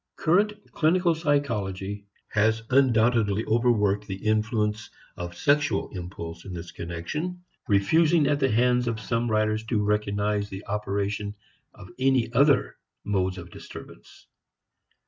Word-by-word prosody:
Current 200 +6 +2 0.2
clinical 170 +2 +2
psychology 105 -10 -2 0.2
has 110 +1 +1
undoubtedly 115 -5 +3
overworked 105 -3 +2
the 95 - -4
influence 110 0 0 0.3
of 85 0 -7
sexual 145 - +1
impulse 85 -2 -7
in 95 -2 -7
this 85 0 -7
connection, 150 - -5 0.2
refusing 155 +11 +3
at 145 0 +1
the 135 -1 +2
hands 125 +2 +2
of 115 -1 -1
some 115 +1 -1
writers 110 0 +1
to 110 -2 0
recognize 105 0 0
the 95 +1 -8
operation 100 0 -2 0.4
of 95 -3 -12
any 130 -3 +2
other 140 +2 +3 0.3
modes 95 -2 -1
of 85 -1 -9
disturbance. - - -12
110 Hz, 125 wpm, -26 LUFS, 100-130 Hz, 0.4 s, undoubtedly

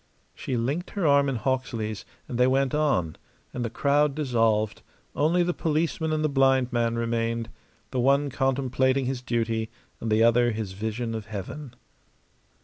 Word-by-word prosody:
She 125 - -3
linked 140 +10 -2
her 200 -4 -2
arm 140 -1 +4
in 135 - -1
Hawksley's, 115 -3 -2 0.2
and 120 - -4
they 125 - +5
went 135 0 +1
on; 135 - +1 0.4
and 125 - -3
the 115 - -2
crowd 145 +4 +2
dissolved; 115 -7 +1 0.3
only 165 +5 +3
the 175 0 0
policeman 160 0 -1
and 155 0 0
the - - +3
blind 135 -3 +2
man 115 -1 +1
remained, 115 0 -1 0.4
the 130 - -1
one 140 +3 +3
contemplating 130 0 +1
his 130 -1 -2
duty 115 -2 -1 0.3
and 115 - -3
the 110 +1 +4
other 120 0 +4
his 105 -3 -4
vision 110 +4 -3
of 110 -1 -5
heaven. 115 +7 -7
125 Hz, 160 wpm, -26 LUFS, 115-140 Hz, 0.4 s, they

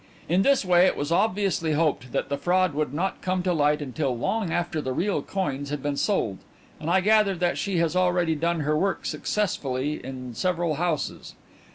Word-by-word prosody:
In 180 +3 +3
this 275 -1 +3
way 180 0 +5
it - - 0
was 145 +2 -3
obviously 185 -4 +1
hoped 145 -5 0
that - - -1
the 140 - -2
fraud 185 0 +2
would 150 -2 -1
not 175 +7 -2
come 185 -1 -1
to 180 -1 +1
light 150 -1 +2
until 130 -1 -2
long 200 - -1
after 170 -2 -1
the 130 -2 -3
real 195 +8 0
coins 145 -8 -3
had 145 -2 -4
been 145 -1 -1
sold, 140 - 0 0.4
and 155 +1 -4
I 190 +2 +4
gather 210 -1 +4
that 175 0 0
she 195 -3 -1
has 165 0 +1
already 180 -2 +2
done 165 +1 0
her 150 +1 +1
work 190 +5 0
successfully 150 -8 -2
in 125 -1 -7
several 170 +1 -1
houses. 170 -3 -2
170 Hz, 195 wpm, -25 LUFS, 145-185 Hz, 0.4 s, way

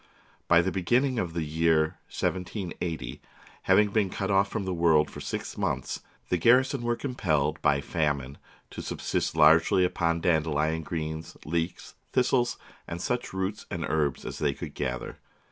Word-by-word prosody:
By 85 0 +5
the 95 - 0
beginning 120 +8 +1
of 85 -5 -2
the 85 -1 -1
year 80 0 +2
1780, 90 - -3 0.4
having 105 0 +4
been 105 -2 +2
cut 95 +2 -2
off 100 0 +4
from 105 -2 -3
the 95 - -1
world 80 -3 +3
for - - -8
six - - -5
months, - - -1 0.3
the 90 - +1
garrison 130 - +4
were 120 0 0
compelled 80 - -1
by 70 - +3
famine 70 -3 -1 0.3
to - - -6
subsist - - -2
largely 80 +4 +5
upon 85 -2 0
dandelion 80 -2 +1
greens, 80 -1 -5
leeks, 85 +3 -3 0.2
this 125 -1 +2
tles, 120 -2 +2 0.3
and 85 - -5
such 125 +6 -2
roots 95 +2 -3
and 85 -2 -3
herbs 75 -4 0
as - - -5
they 70 -2 +1
could - - -7
gather. 65 -1 -4
85 Hz, 160 wpm, -28 LUFS, 80-100 Hz, 0.4 s, By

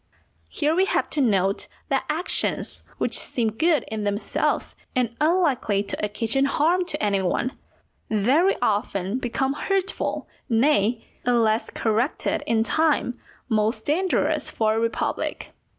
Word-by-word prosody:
Here 295 - 0
we 370 +3 +3
have - - 0
to 295 - 0
note 195 -5 +1 0.2
that - - +1
actions 320 +4 -1 0.2
which - - -1
seem 230 -3 -1
good 310 +4 +2
in 215 -1 -4
themselves 205 +1 -1 0.2
and 240 -2 0
unlikely 300 - +2
to 200 - -5
occasion 225 +6 0
harm 330 +6 +2
to - - -4
any 200 -2 +2
one, 190 +7 0 0.6
very 260 - +3
often 200 0 0
become 265 +2 -1
hurtful, 390 +5 -2 0.2
nay, 230 -2 +2 0.2
unless 230 -2 +2
corrected 230 +5 0
in 225 -1 +3
time, 295 -3 +1 0.3
most 220 0 0
dangerous 360 +6 +1
for 215 -1 +1
a 220 - 0
republic. 230 0 -2
235 Hz, 130 wpm, -24 LUFS, 215-300 Hz, 0.6 s, we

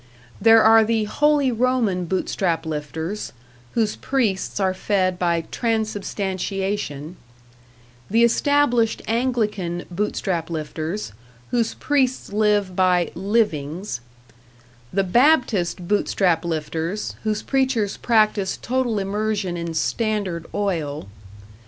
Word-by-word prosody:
There 225 0 +7
are 225 0 +7
the 220 0 +1
Holy 290 +4 +2
Roman 230 -6 +1
Bootstrap 175 -2 -1
lifters, 160 +5 -4 0.4
whose 220 -2 +1
priests 220 -8 -1
are 190 -1 +2
fed 185 -1 0
by 170 -2 +1
Transubstantiation; 195 - -2 0.9
the 230 +3 +4
established 240 -2 +2
Anglican 215 -7 -1
Bootstrap 175 -3 -2
lifters, 155 - -4 0.4
whose 235 -2 0
priests 265 -7 0
live 205 -3 +2
by 180 -2 +2
"livings"; 180 - -1 0.9
the 195 +1 +1
Baptist 210 - +2
Bootstrap 185 -4 +1
lifters, 165 +4 -3
whose 215 -1 -1
preachers 260 -7 0
practice 215 -4 +2
total 250 -2 -1
immersion 200 -1 -1
in 170 -1 -4
Standard 200 -4 -1
Oil. 155 - -2
200 Hz, 95 wpm, -22 LUFS, 175-225 Hz, 0.9 s, There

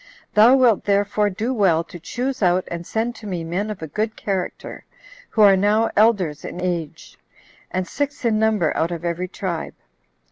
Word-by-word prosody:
Thou 225 +5 +7
wilt 245 -6 +3
therefore 205 +1 +1
do 220 +6 -2
well 185 -8 +2
to 175 - -11
choose 255 +9 -4
out 180 -1 +2
and 170 0 -5
send 230 +2 -1
to 215 - -9
me 180 -4 -3
men 180 +6 -3
of 205 -6 -6
a - - -4
good 215 +8 -2
character, 190 -3 -4 0.5
who 215 - +3
are 200 -2 +7
now 210 +4 +2
elders 195 -9 +2
in - - -7
age, 175 -4 -4 0.5
and 185 0 -2
six 285 -2 -3
in 220 -2 +2
number 215 -7 +1
out 165 - 0
of 175 -1 -5
every 170 +2 -2
tribe. 180 -3 -5
200 Hz, 180 wpm, -21 LUFS, 175-220 Hz, 0.5 s, Thou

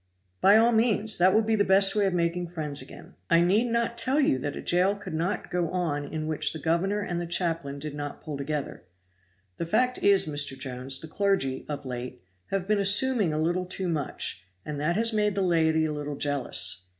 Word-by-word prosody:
"By 200 +2 +7
all 230 +2 +4
means; 220 -2 +2
that 185 +2 +5
will 220 +3 +3
be 220 +1 +1
the 205 - +3
best 195 0 +4
way 205 -2 +2
of 190 - -1
making 170 +1 -1
friends 155 -4 -2
again. - - -12 0.2
I 170 0 +5
need 195 +7 +3
not 235 0 0
tell 265 +3 +2
you 135 - +2
that 145 +2 -4
a - - -6
jail 185 +3 +2
could 200 -4 -8
not 170 +5 -2
go 175 -2 0
on 160 -5 -2
in 155 +1 -5
which 155 -1 0
the - - -5
governor 185 +6 0
and 175 -4 -3
the 170 - -5
chaplain 165 -5 -1
did 150 +1 -6
not 145 -1 -6
pull 155 -2 -5
together. 140 -6 -4 0.7
The 170 - -4
fact 250 +8 +1
is, 200 -1 +4
Mr. 145 -3 -1
Jones, 130 0 -3
the 160 - -8
clergy, 185 -7 -1
of 145 -1 -5
late, 125 0 -6 0.2
have 195 -1 -3
been 210 -1 +2
assuming 205 -1 +3
a 150 - -2
little 175 +3 -1
too 185 0 -4
much, 150 - -3 0.2
and 145 -1 -5
that 165 +3 0
has 225 +2 +1
made 210 -2 +1
the 195 - 0
laity 160 -3 +2
a 155 - -2
little 150 -1 -5
jealous. 130 -10 -2
170 Hz, 215 wpm, -27 LUFS, 145-200 Hz, 0.7 s, By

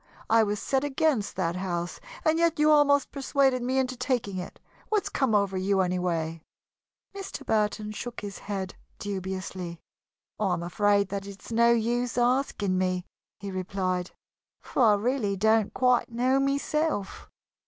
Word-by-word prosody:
I 225 0 +6
was 210 -1 0
set 265 +4 0
against 285 -5 0
that 170 +1 -1
house 175 -2 -3 0.3
and 320 +1 +3
yet 335 -1 +2
you 300 +1 +4
almost 285 -2 +4
persuaded 270 -2 +1
me 255 +2 0
into 260 -1 0
taking 245 -6 -1
it. 180 - -8 0.3
What's 425 -3 +1
come 260 -6 +1
over 200 -2 +1
you, 195 +1 +2
anyway?" 170 -3 -1 0.7
Mr. 390 -7 -7
Burton 210 -1 0
shook 240 +3 -6
his 205 -1 -7
head 195 -2 -4 0.2
dubiously. 185 -3 -5 0.6
"I 200 -4 +1
am 170 -1 -2
afraid 200 +3 +2
that 200 0 -4
it 200 -1 -11
is - - -10
no 235 +1 +5
use 235 +1 0
asking 240 -6 +1
me," 185 -1 0 0.3
he 200 0 -6
replied, 185 -1 -2 0.5
"for - - -2
I 215 -4 +6
really 210 -2 0
don't 220 +1 +3
quite 250 -2 +2
know 255 +3 +2
myself." 280 -4 -1
210 Hz, 155 wpm, -27 LUFS, 190-260 Hz, 0.7 s, I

